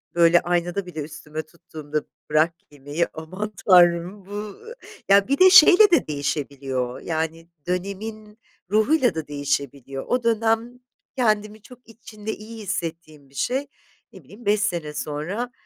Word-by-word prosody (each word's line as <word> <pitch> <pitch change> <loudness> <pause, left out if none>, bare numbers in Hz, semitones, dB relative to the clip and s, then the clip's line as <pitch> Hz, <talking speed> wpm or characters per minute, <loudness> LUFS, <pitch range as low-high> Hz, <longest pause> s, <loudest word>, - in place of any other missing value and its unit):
böyle 170 0 +5
aynada 175 +2 -1
bile 180 -3 -8
üstüme 155 +1 -7
tuttuğumda 155 -2 -6 0.3
bırak 155 +2 +3
giymeyi 145 +3 -4
aman 185 +7 -6
tanrım 180 +1 +4
bu 205 +1 -6 0.5
ya 200 0 +5
bir 275 +2 +1
de 375 0 +8
şeyle 370 +3 +8
de 340 - +3
değişebiliyor 140 -4 -3
yani 165 0 -3 0.2
dönemin 210 +4 -5 0.3
ruhuyla 235 - +3
da 160 -2 -4
değişebiliyor. 140 -2 -3
O 250 -1 0
dönem 230 +1 0 0.4
kendimi 215 -3 0
çok 250 +3 -15
içinde 220 -1 -8
iyi 220 +1 -10
hissettiğim 165 -6 -5
bir 135 - -22
şey. 265 - -1 0.5
Ne - - -14
bileyim 225 +4 -15
5 205 +1 +2
sene 170 -7 -2
sonra 165 +13 -4
180 Hz, 135 wpm, -23 LUFS, 155-215 Hz, 0.5 s, de